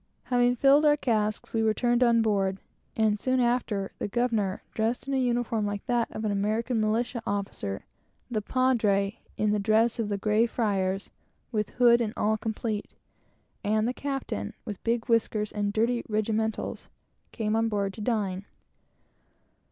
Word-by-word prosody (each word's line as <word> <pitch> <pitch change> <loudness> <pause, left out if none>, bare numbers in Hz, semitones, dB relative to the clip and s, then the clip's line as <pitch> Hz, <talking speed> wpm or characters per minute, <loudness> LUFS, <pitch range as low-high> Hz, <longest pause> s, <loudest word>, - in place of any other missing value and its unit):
Having 245 0 +2
filled 275 +4 +5
our 295 -1 +5
casks, 215 -6 -1
we 225 - +1
returned 240 +2 +2
on 235 -2 +4
board, 195 -3 +1 0.4
and 215 -2 +2
soon 255 +3 +1
after, 235 -5 0
the - - -2
governor, 215 -4 0
dressed 225 +4 -1
in 275 - -2
a - - +2
uniform 240 -3 0
like 205 0 -4
that 240 -1 +1
of 215 - -5
an 210 - +1
American 220 +4 0
militia 235 +3 0
officer, 195 - -3 0.5
the 215 -3 0
Padre, 210 -5 +1 0.2
in 210 -1 +2
the 210 - +1
dress 220 +3 +2
of 220 -2 -1
the 205 - -1
grey 215 +3 +2
friars, 195 -4 -1 0.4
with 215 -3 -1
hood 240 -1 +6
and 220 -2 -1
all 215 +1 +2
complete, 220 -1 -4 0.7
and 215 +2 +1
the 250 - -1
Capitan, 270 - -4
with 210 -5 -6
big 230 0 0
whiskers 220 -2 +1
and 205 -1 -1
dirty 235 +3 +1
regimentals, 220 +1 -1 0.4
came 215 -2 -1
on 225 0 +2
board 200 -2 -1
to 215 - -8
dine. 205 -4 -1
220 Hz, 160 wpm, -27 LUFS, 210-240 Hz, 0.7 s, hood